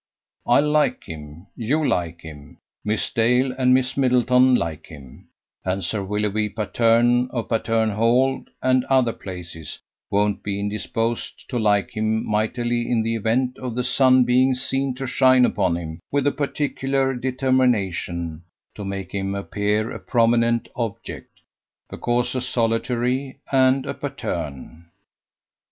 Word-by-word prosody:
I - - +5
like 150 0 +1
him, 75 +2 -10
you 145 +6 0
like 85 -1 -1
him, 75 -3 -12 0.3
Miss 105 +1 -1
Dale 125 +3 +2
and 130 -1 +2
Miss 130 0 +2
Middleton 125 -1 +4
like 80 -7 -3
him; 70 -5 -13 0.4
and 95 +1 -2
Sir 100 +4 -2
Willoughby 105 +1 -1
Patterne, 120 +3 +2
of 115 -7 -4
Patterne 115 -1 +1
Hall 120 +5 +2 0.2
and 130 -1 +3
other 130 -4 +2
places, 85 -5 -8 0.3
won't 105 0 +1
be 100 -1 -3
indisposed 115 +3 -3
to 125 - -1
like 105 -2 +2
him 110 +1 0
mightily 120 +3 -1
in 115 -2 +1
the 115 +1 -1
event 120 +4 0
of 125 -3 -5
the 125 - 0
sun 130 0 +4
being 130 +2 +3
seen 135 +1 -1
to 135 +1 -5
shine 130 0 +4
upon 90 -7 0
him 80 -1 -7
with 140 -1 +1
a 145 - +3
particular 135 -2 -1
determination 120 - 0 0.3
to 105 - -8
make 95 -1 -5
him 100 0 -2
appear 105 +2 -1
a - - -6
prominent 115 0 +2
object, 115 -4 -5 0.6
because 120 +1 -1
a 130 - -2
solitary, 125 +2 -1
and 130 0 +3
a - - -3
Patterne." 75 -6 -5
Dr. 85 +1 -20
115 Hz, 140 wpm, -22 LUFS, 100-130 Hz, 0.6 s, I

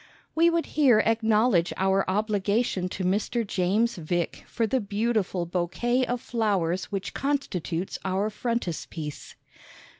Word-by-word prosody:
We 335 +1 +5
would 335 -1 +1
here 270 -7 +4
acknowledge 220 -4 +3
our 190 +1 +2
obligation 205 -1 0
to 185 - -4
Mr. 210 +5 0
James 200 +5 +1
Vick 170 +1 -2
for 230 - 0
the 260 +4 +1
beautiful 205 -3 0
Bouquet 215 +9 0
of 245 0 -1
Flowers 200 -8 0
which 195 -1 -4
constitutes 190 - -2
our 195 +3 0
Frontispiece. 175 -9 -4
205 Hz, 120 wpm, -26 LUFS, 185-235 Hz, -, We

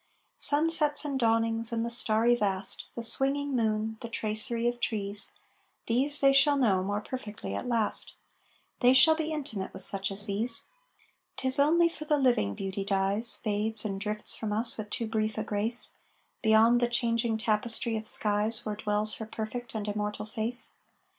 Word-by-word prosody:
Sunsets 300 -1 +3
and 275 -2 -3
dawnings 225 -1 +1
and 230 0 -2
the - - -3
starry 230 0 +4
vast, 195 -4 -2
The 235 - -5
swinging 275 +4 0
moon, 220 -1 -1
the 235 - -7
tracery 230 +1 -2
of 240 0 -2
trees 205 -3 -1 0.6
These 270 +5 +1
they 275 0 +5
shall 285 +1 +4
know 210 -8 +2
more 205 +2 -3
perfectly 215 - -7
at 100 - -5
last, 230 -3 -1 0.6
They 250 0 +4
shall 315 +5 +7
be 315 0 -3
intimate 245 -11 -5
with 190 - 0
such 195 0 +1
as 200 +1 -4
these. 225 +3 -2 0.7
'Tis 260 +1 +1
only 335 +4 +4
for 320 -2 -8
the 300 -1 +1
living 240 - +1
Beauty 195 0 -4
dies, 200 +3 +1
Fades 215 +1 0
and 195 -2 -4
drifts 210 0 -3
from 220 -2 -5
us 225 +3 0
with 210 -1 -7
too 235 - -3
brief 220 -1 -2
a 215 - -2
grace, 220 +3 0 0.5
Beyond 225 +2 +4
the 240 - +2
changing 230 -1 0
tapestry 225 +1 0
of 220 0 -5
skies 215 +2 +5
Where 210 -1 -3
dwells 210 0 +1
her 220 - -7
perfect 225 +2 -7
and 215 -1 -4
immortal 210 0 -4
face. 225 +3 -2
225 Hz, 170 wpm, -28 LUFS, 210-245 Hz, 0.7 s, shall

